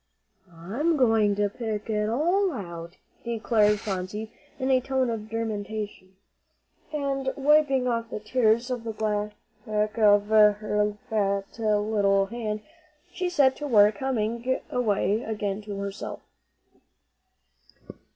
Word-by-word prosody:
"I'm 225 - -1
going 225 -5 +3
to 205 0 +1
pick 215 0 -4
it 210 -1 0
all 350 - +2
out," 170 -5 -7 0.3
declared 220 -3 +2
Phronsie 210 +2 -4 0.2
in 265 0 0
a 255 -1 +4
tone 260 -1 0
of 215 -1 -5
determination. 210 -3 -5 0.8
And 275 -3 -1
wiping 280 -2 +3
off 230 -1 -1
the - - -5
tears 230 +2 +1
on 245 -2 -3
the 225 -1 -4
back 210 0 -3
of 205 -1 +5
her 210 -1 +3
fat 200 -2 -1
little 205 -2 +2
hand, 215 -1 -4 0.5
she 365 -1 -2
set 280 -7 +3
to 295 - -4
work, 210 -4 +5
humming 240 0 -1
away 215 -2 +1
again 210 -3 -3
to 205 -2 -5
herself. 200 0 -5
215 Hz, 120 wpm, -26 LUFS, 205-250 Hz, 0.8 s, of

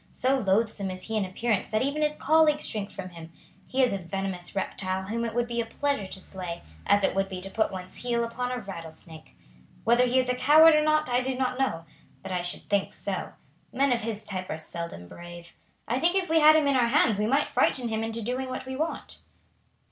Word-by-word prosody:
So 265 +2 +1
loathsome 205 -1 +1
is 185 0 -7
he 225 - -4
in 210 -3 +1
appearance 205 +2 -1
that 215 +2 +1
even 280 +3 -1
his 300 0 +1
colleagues 305 0 +3
shrink 210 -2 -4
from 185 -1 -7
him. 165 -2 -11 0.4
He 260 0 +2
is 250 - +2
a 195 - -2
venomous 190 0 -4
reptile 190 -1 -2
whom 225 +4 -3
it 225 -1 -4
would 240 0 +2
be 235 0 -2
a - - -4
pleasure 280 -5 -1
to 190 - -9
slay, 180 -2 -7 0.2
as 205 0 +4
it - - +2
would 195 0 0
be 185 -1 -5
to 195 +1 -8
put 220 +1 +1
one's 185 -1 -8
heel 235 -1 -1
upon 245 +2 -3
a 250 - -2
rattlesnake. 165 -6 -10 0.5
Whether 240 +2 +4
he 250 +2 +1
is 255 -1 +3
a 250 - +2
coward 300 +6 +7
or 305 - +4
not 305 0 +2
I 245 0 +2
do 260 0 -2
not 255 0 -1
know, 165 -12 -1 0.4
but 195 - -6
I 180 -1 0
should 175 0 -6
think 200 -1 0
so. - - -4 0.4
Men 270 +1 +2
of 235 - -1
his 220 -1 -4
type 185 -2 -5
are - - -3
seldom 160 - -5
brave. 175 - -11 0.3
I 245 +3 0
think 345 +5 +2
if 370 -4 0
we 325 - +5
had 310 0 +8
him 310 -1 +4
in 280 - +3
our 245 -2 +4
hands 225 -3 +3
we 210 - +1
might 275 +5 +2
frighten 245 -3 +1
him 220 0 -1
into 225 0 -3
doing 255 +3 -2
what 255 0 -5
we 260 0 -5
want." 315 +4 -4
230 Hz, 235 wpm, -27 LUFS, 190-260 Hz, 0.5 s, had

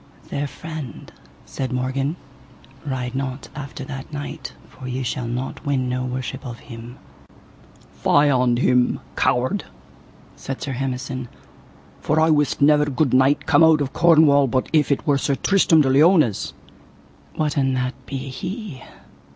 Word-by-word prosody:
Fair 145 +1 -3
friend, 155 -3 -8 0.3
said 130 -1 -4
Morgan, 130 +4 -1 0.7
ride 125 -2 -3
not 135 0 -4
after 140 -1 -7
that 135 +1 -8
knight, 145 -1 -6
for 130 - -11
ye 130 +1 -3
shall 120 0 -3
not 125 +3 -4
win 135 -3 0
no 125 0 -2
worship 130 +1 -4
of 120 -4 -7
him. 120 0 -11 0.9
Fie 145 - +3
on 125 -2 +2
him, 125 0 +2 0.2
coward, 130 +12 +1 0.7
said 135 0 -6
Sir 140 - -4
Hemison, 130 0 -4 0.7
for 155 +2 +1
I 160 0 +4
wist 150 -2 +2
never 150 0 +5
good 145 -1 0
knight 135 +2 +3
come 160 0 +5
out 160 -1 +6
of 140 -2 -2
Cornwall 155 -4 +5
but 130 +1 -1
if 150 -2 +3
it 140 - 0
were 145 -2 +2
Sir 140 +1 0
Tristram 180 -2 +4
de 135 - +2
Liones. 150 - +3 0.8
What 150 -2 -1
an 135 -2 +1
that 125 0 -1
be 140 - -4
he? 155 - -6
135 Hz, 150 wpm, -22 LUFS, 130-150 Hz, 0.9 s, out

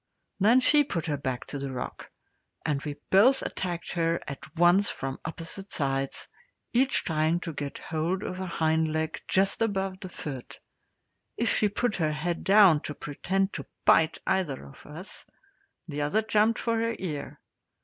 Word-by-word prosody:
Then 225 +6 +6
she 295 +3 +5
put 170 - -3
her 150 -3 -1
back 130 -3 -3
to 140 - -6
the 140 0 -4
rock, 125 -1 -6 0.6
and 140 -2 0
we 145 -1 -4 0.2
both 240 +8 +6
attacked 175 -2 -3
her 165 -1 +1
at 140 -2 -5 0.2
once 175 +4 +5
from 135 0 -4
opposite 165 +4 -6
sides, 135 -2 -1 0.5
each 260 +3 +3
trying 160 0 +1
to 165 -2 -5
get 145 -1 -5
hold 170 +5 -2
of 185 - -4
a 190 - -3
hind 160 -1 +1
leg 155 0 -2
just 195 +3 +2
above 195 -4 0
the 185 - -7
foot. 135 -7 -7 0.8
If 235 - +2
she 210 - +3
put 220 +2 0
her 155 -3 +1
head 170 +3 -2
down 195 -5 +7
to 150 - -5
pretend 190 +8 -1
to - - -5 0.2
bite 160 0 +5
either 150 - 0
of 70 - -14
us, 165 +7 -10 0.6
the 150 -2 -3
other 155 +10 +1
jumped 215 +1 +3
for 230 -1 0
her 230 0 0
ear. 155 -6 -5
170 Hz, 170 wpm, -28 LUFS, 150-195 Hz, 0.8 s, down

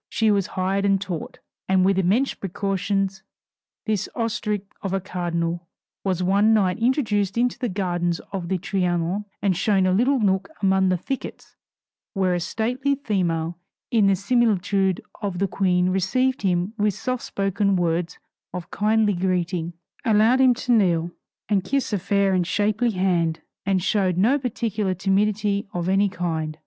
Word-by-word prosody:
She 220 -1 +2
was 200 -2 +1
hired 190 +2 0
and 195 -1 +3
taught; 180 -5 -5 0.3
and 190 -1 +4
with 195 0 +3
immense 210 +9 +2
precautions, 195 0 -2 0.6
this 215 -4 -1
ostrich 215 -3 -2 0.2
of 195 -2 -3
a 195 - +1
cardinal 170 -2 -3 0.4
was 185 -2 0
one 200 +4 +4
night 185 -4 +1
introduced 225 -5 +1
into 245 0 +1
the 250 -2 -1
gardens 175 -3 -1
of 190 -3 -4
the 190 - +1
Trianon, 180 +1 -1 0.2
and 195 -3 +2
shown 195 +1 +2
a 185 - +2
little 255 +7 +3
nook 195 -2 +1
among 190 -1 +3
the 185 - +2
thickets 265 +9 -6 0.6
where 190 -2 +1
a 175 - 0
stately 250 +9 -1
female 175 - -1 0.3
in 220 -4 +4
the 195 - +4
similitude 200 -3 +1 0.2
of 200 -4 -3
the 195 +2 +1
Queen 180 -1 +1
received 255 +8 +1
him 185 +1 0
with 205 -2 +1
soft 255 +4 -3
spoken 195 0 0
words 175 0 -1 0.4
of 180 +1 -7
kindly 215 0 +2
greeting, 175 -2 -1 0.3
allowed 225 +4 +4
him 255 -2 +5
to 250 +1 -2
kneel 175 -7 +2 0.4
and 200 -2 +1
kiss 270 +2 -1
a 205 - +1
fair 200 +1 +1
and 180 -2 +1
shapely 210 +5 +1
hand, 175 -5 0 0.3
and 190 -2 +1
showed 190 -4 +1
no 240 +10 +3
particular 220 -6 -2
timidity 200 +2 0
of 175 0 -2
any 195 +2 +3
kind. 160 -4 -3
195 Hz, 160 wpm, -23 LUFS, 180-215 Hz, 0.6 s, him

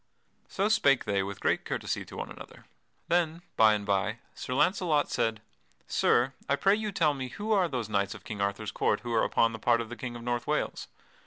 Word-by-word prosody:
So 200 +1 0
spake 140 - +3
they 100 -1 +1
with 100 +1 -5
great - - +1
courtesy - - -3
to - - -10
one - - -5
another. - - -12 0.4
Then, 170 -1 +1
by 110 -1 +6
and 105 -1 -4
by, 100 +2 0 0.2
Sir 125 - -5
Launcelot 170 -1 +2
said: 115 -2 -1 0.4
"Sir, 125 +3 +2 0.2
I 140 - +4
pray 195 +7 +3
you 215 0 -1
tell 155 -5 +2
me 130 -2 -4
who 205 - -5
are 195 -4 +4
those 125 -8 -3
knights 100 -2 0
of - - -12
King 105 -3 -5
Arthur's 100 +1 -2
court 105 - 0
who 120 -1 -4
are 110 - +3
upon 115 0 +2
the 110 - -6
part 120 +1 +3
of 115 -1 -4
the 120 - -6
King 120 0 -6
of 120 - -8
North 120 0 -2
Wales? - - -1
120 Hz, 220 wpm, -29 LUFS, 110-160 Hz, 0.4 s, by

